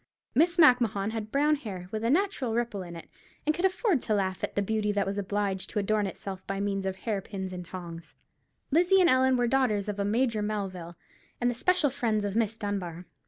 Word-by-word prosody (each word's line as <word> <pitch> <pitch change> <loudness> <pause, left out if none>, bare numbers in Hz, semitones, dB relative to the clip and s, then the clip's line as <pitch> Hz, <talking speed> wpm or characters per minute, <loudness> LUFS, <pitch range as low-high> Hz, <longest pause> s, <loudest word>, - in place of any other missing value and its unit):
Miss 340 +7 +3
Macmahon 235 - +4
had 220 -1 -5
brown 295 +2 +3
hair, 190 -9 -7
with 220 0 -3
a 230 - +1
natural 290 - +1
ripple 235 -4 -1
in 175 -1 -8
it, 165 - -10 0.4
and 305 - +3
could 350 +4 0
afford 380 - +2
to 215 - 0
laugh 190 -2 -1
at 200 - -1
beauty 215 0 0
that 205 -1 0
was 195 +1 -2
obliged 200 -1 -2
to - - -6
adorn 210 0 +1
itself 190 0 -7
by 195 0 -2
means 195 -1 -1
of 190 - -2
hair 200 +1 -2
pins 190 -1 -6
and 180 0 -5
tongs. 170 -2 -9 0.6
Lizzie 355 +5 +5
and 355 -2 +5
Ellen 260 0 +4
were 245 - +2
the 235 - -1
daughters 240 -7 +2
of 205 -1 -3
a - - +1
Major 235 -4 +1
Melville, 190 -5 -4 0.4
and 245 0 +2
the - - -3
special 320 +3 +2
friends 225 -6 0
of 200 0 -3
Miss 225 -1 +1
Dunbar. 185 -5 -4
210 Hz, 215 wpm, -28 LUFS, 195-255 Hz, 0.6 s, Lizzie